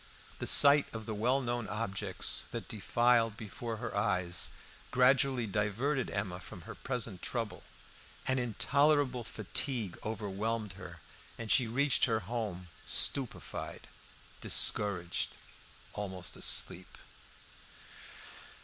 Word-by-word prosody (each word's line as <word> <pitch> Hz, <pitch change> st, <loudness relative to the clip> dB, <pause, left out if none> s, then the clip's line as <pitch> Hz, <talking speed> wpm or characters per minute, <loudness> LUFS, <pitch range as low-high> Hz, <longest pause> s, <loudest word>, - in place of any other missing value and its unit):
The -, -, -3 dB
sight 140 Hz, 0 st, +6 dB
of 110 Hz, -1 st, -6 dB
the 110 Hz, -, -4 dB
well 125 Hz, +6 st, +1 dB
known 120 Hz, -3 st, -2 dB
objects 100 Hz, -3 st, 0 dB
that -, -, -6 dB
defiled 115 Hz, +1 st, +2 dB
before 110 Hz, +2 st, -6 dB
her 120 Hz, +2 st, -5 dB
eyes 90 Hz, -4 st, +2 dB, 0.4 s
gradually 130 Hz, -1 st, +3 dB
diverted 110 Hz, +7 st, -1 dB
Emma 100 Hz, -3 st, -3 dB
from 90 Hz, 0 st, -10 dB
her -, -, -9 dB
present 115 Hz, -8 st, -4 dB
trouble. 115 Hz, -4 st, -3 dB, 0.7 s
An 130 Hz, 0 st, +1 dB
intolerable 135 Hz, +2 st, +1 dB
fatigue 115 Hz, -1 st, -3 dB
overwhelmed 105 Hz, 0 st, -3 dB
her, 85 Hz, -3 st, -11 dB, 0.4 s
and 115 Hz, -2 st, -4 dB
she 125 Hz, -4 st, +5 dB
reached 135 Hz, +4 st, +3 dB
her 110 Hz, -3 st, 0 dB
home 100 Hz, -4 st, -4 dB
stupefied, 135 Hz, -4 st, 0 dB, 0.6 s
discouraged, 90 Hz, -4 st, +2 dB, 0.6 s
almost 95 Hz, -3 st, -3 dB
asleep. -, -, +2 dB
115 Hz, 105 wpm, -32 LUFS, 100-125 Hz, 0.7 s, sight